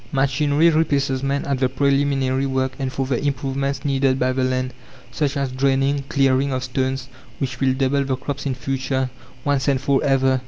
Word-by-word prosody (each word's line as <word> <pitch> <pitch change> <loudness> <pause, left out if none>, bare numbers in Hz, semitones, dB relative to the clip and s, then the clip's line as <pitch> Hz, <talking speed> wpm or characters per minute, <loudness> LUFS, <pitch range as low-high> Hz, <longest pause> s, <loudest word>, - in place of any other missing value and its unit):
Machinery 145 +4 +3
replaces 140 -4 +1
man 140 +1 -1
at 140 -2 -1
the 130 -1 +2
preliminary 135 0 +1
work 130 -1 0
and 135 -1 -2
for 135 0 -2
the 130 -1 -1
improvements 135 0 -2
needed 135 -2 +2
by 130 0 +1
the 130 0 0
land 130 0 -1 0.4
such 145 -2 -1
as 135 -2 -1
draining, 135 +2 +1
clearing 135 0 +2
of 130 -1 -2
stones 130 0 -2 0.3
which 130 -2 -3
will 130 -1 +2
double 135 +1 +1
the 135 -1 -1
crops 140 +2 -4
in 130 - -1
future, 130 0 -2 0.3
once 145 -1 +1
and 135 -2 +3
for 140 0 +1
ever. 135 -1 +3
135 Hz, 185 wpm, -21 LUFS, 130-140 Hz, 0.4 s, Machinery